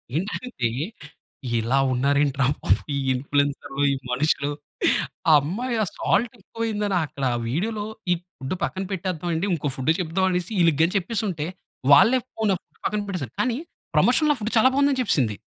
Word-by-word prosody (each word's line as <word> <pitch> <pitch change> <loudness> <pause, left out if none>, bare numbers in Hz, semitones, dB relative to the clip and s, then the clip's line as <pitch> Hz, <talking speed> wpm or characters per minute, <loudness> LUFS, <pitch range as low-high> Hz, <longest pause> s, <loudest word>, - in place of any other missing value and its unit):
ఏంటంటే 190 - -2 0.9
ఇలా 115 +4 +1 0.2
ఉన్నారేంటి 140 +2 +2
రా 135 - +4 0.2
బాబు - - +3 0.3
ఇన్‌ఫ్లుయెన్సర్లు, 140 +1 -1
ఈ - - +2 0.2
మనుషులు, 140 +2 +1 0.8
ఆ - - +7
అమ్మాయి 230 - -2
ఆ - - 0
సాల్ట్ 230 +4 +1
ఎక్కువైయిందని 210 -1 -2
అక్కడ 140 -2 -5 0.2
వీడియోలో 205 - -2 0.3
ఈ - - +5 0.2
ఫుడ్ 135 +6 -4
పక్కన 190 - -2
పెట్టేద్దామండి. 175 -1 -2
ఇంకో 145 -3 -2
ఫుడ్ 130 +4 +2
చెప్దామనేసి 180 +2 0
ఈళ్ళకి 165 -1 +4
చెప్పేసుంటే, 190 -5 -2 0.5
వాళ్ళే 230 - +6
ఫోన్‌నే 215 -3 0 0.3
పక్కన 210 0 0
పెట్టేసారు 155 - -4
కానీ 250 -1 0 0.4
ప్రమోషన్‌లో 300 -2 +4
ఫుడ్ 215 +1 -3
చాలా 240 +4 +6
బాగుందని 280 -1 +3
చెప్పేసింది. 125 - +1
180 Hz, 130 wpm, -24 LUFS, 145-215 Hz, 0.9 s, ఆ